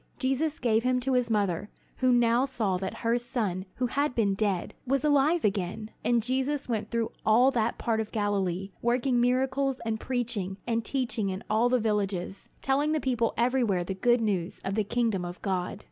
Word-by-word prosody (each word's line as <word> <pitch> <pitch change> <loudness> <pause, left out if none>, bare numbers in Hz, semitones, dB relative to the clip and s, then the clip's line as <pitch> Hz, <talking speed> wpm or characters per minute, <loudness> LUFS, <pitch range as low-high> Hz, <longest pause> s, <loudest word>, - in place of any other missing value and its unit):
Jesus 285 +4 0
gave 225 -2 +2
him 250 +1 +1
to 265 +1 0
his 250 -2 +2
mother, 200 -3 0 0.3
who 255 -1 +3
now 240 +1 +4
saw 215 -8 -1
that 190 +1 -4
her 235 +1 +3
son 215 -7 -2
who 255 - 0
had 280 +2 0
been 205 -4 +2
dead, 195 -3 -1
was 275 0 +1
alive 300 +2 +3
again. 205 +2 -2
And 240 -2 +2
Jesus 265 +4 -1
went 220 -3 -2
through 230 -1 -1
all 240 +5 +5
that 235 -2 0
part 225 -2 0
of 220 - -6
Galilee, 195 -3 -1
working 245 +1 +2
miracles 265 +2 +1
and 220 -1 -1
preaching 220 -7 -2
and 230 -1 0
teaching 240 -5 -1
in 190 +1 -4
all 225 +3 +3
the 255 - +3
villages, 200 -4 -2
telling 285 +3 +2
the 310 - +1
people 240 -4 0
everywhere 235 -7 +2
the 190 - -4
good 240 +5 +2
news 195 -5 -1
of 195 - -1
the 215 +1 +1
kingdom 225 -3 0
of 175 0 -6
God. 190 0 -2
230 Hz, 190 wpm, -28 LUFS, 200-255 Hz, 0.3 s, all